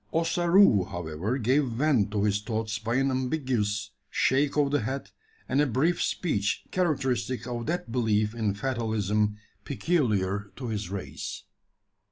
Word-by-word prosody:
Ossaroo, 170 - +4
however, 90 - -3
gave 135 +4 +2
vent 120 -3 +2
to 105 -1 -1
his 105 0 +1
thoughts 110 -1 -2
by 115 +2 -2
an 135 +1 +2
ambiguous 125 -6 -1 0.2
shake 140 +2 +2
of 145 -2 +3
the 145 - +3
head, 135 +5 -4 0.4
and 140 - +2
a 150 - +3
brief 140 +9 +1
speech 105 - 0
characteristic 135 -9 0
of 120 0 -4
that 175 -5 -2
belief 110 -3 +1
in 110 -4 -1
fatalism 105 -4 0 0.3
peculiar 105 - 0
to 125 -3 -5
his 105 -4 -3
race. 100 -1 -5
120 Hz, 140 wpm, -27 LUFS, 105-140 Hz, 0.4 s, Ossaroo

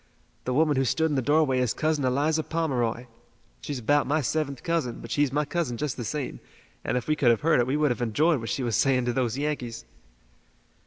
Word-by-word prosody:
The 125 - -1
woman 150 -1 +3
who 135 - +3
stood 160 +5 +1
in - - 0
the 135 - +1
doorway 145 0 +2
is 125 -3 0
Cousin 155 -2 0
Eliza 145 +5 +1
Pomeroy. 125 -8 -1 0.6
She's 145 - -4
about 145 +4 +2
my 150 +3 +2
seventh 140 -1 -2
cousin, 165 -8 -1
but - - -9
she's 145 -2 +2
my 150 +2 0
cousin 150 -7 -2
just 150 -1 -2
the 120 - -5
same, 145 +4 -4 0.4
and - - -1
if 125 - -4
we 155 - +2
could 140 -5 +3
have 115 -2 +3
heard 160 -3 +3
it 120 - +2
we 135 +3 0
would 150 -3 +2
have 120 - -3
enjoyed 145 +7 +2
what 115 - -5
she 135 - -2
was 115 -3 0
saying 130 0 +2
to 120 - 0
those 125 -1 -1
Yankees." 140 -6 -3
140 Hz, 225 wpm, -26 LUFS, 125-150 Hz, 0.6 s, woman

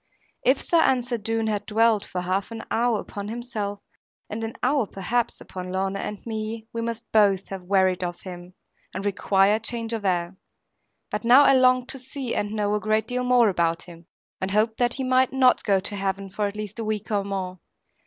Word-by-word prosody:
If 260 +2 +4
Sir 335 -1 +3
Ensor 245 -4 +1
Doone 225 +1 -1
had 210 -1 -2
dwelled 220 -1 +3
for 180 - -4
half 185 +2 -1
an 225 -1 -7
hour 235 -1 +2
upon 200 0 -6
himself, 215 -3 -4 0.5
and 220 +2 -4
an 225 0 -4
hour 265 -3 +2
perhaps 230 +6 -2
upon 185 -1 -7
Lorna 190 +1 -1
and 210 - -6
me, 220 0 -4
we 230 - -2
must 230 0 -5
both 200 -3 +4
have 190 -2 -7
wearied 185 -1 +2
of 175 -1 -4
him, 180 -1 -9 0.4
and 195 - -4
required 200 +1 +2
change 230 -1 -3
of 225 -2 -3
air. 180 -1 0 0.8
But 210 - -2
now 250 +5 +7
I 275 - +6
longed 255 -1 +4
to 270 - -6
see 260 -1 -4
and 205 - -1
know 210 -1 0
a 210 - +1
great 215 +1 +1
deal 250 0 -1
more 250 -2 +5
about 170 -2 0
him, 170 -1 -13 0.3
and 190 - -1
hoped 215 +3 +1
that 240 -1 +2
he 265 - -3
might 255 0 +3
not 260 -1 +4
go 195 -2 +3
to 205 +2 -3
Heaven 195 0 -3
for 205 +1 -1
at 200 - -6
least 210 +1 -6
a - - -2
week 215 0 -3
or 205 -1 +1
more. 190 -2 -4
215 Hz, 205 wpm, -25 LUFS, 195-235 Hz, 0.8 s, now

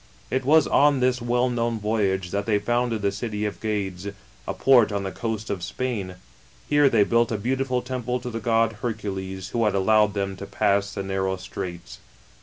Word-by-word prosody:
It 130 0 0
was 155 +2 +5
on 145 -1 +4
this 125 -1 +1
well 120 +1 +1
known 120 -2 -1
voyage, 100 -4 0
that 100 +1 -2
they 105 -2 +3
founded 120 +1 -1
the 100 - +2
city 105 +1 -3
of 105 - -4
Gades, 100 -3 -3 0.4
a - - -1
port 120 -5 +5
on 100 -1 -2
the 95 - -3
coast 110 -1 -4
of 95 -3 -3
Spain. 100 -4 -3 0.5
Here 145 -1 +4
they 110 -4 +4
built 115 +2 +2
a 110 - 0
beautiful 125 +3 -1
temple 125 -1 -3
to 125 - -5
the 115 - -4
god 115 -1 +1
Hercules, 95 -5 -4
who 115 +2 0
had 105 -2 +1
allowed 105 +1 +3
them 100 -1 -2
to 100 - -7
pass 100 0 +1
the 100 - -3
narrow 95 0 -1
straits. 90 -2 -7
110 Hz, 195 wpm, -24 LUFS, 100-120 Hz, 0.5 s, was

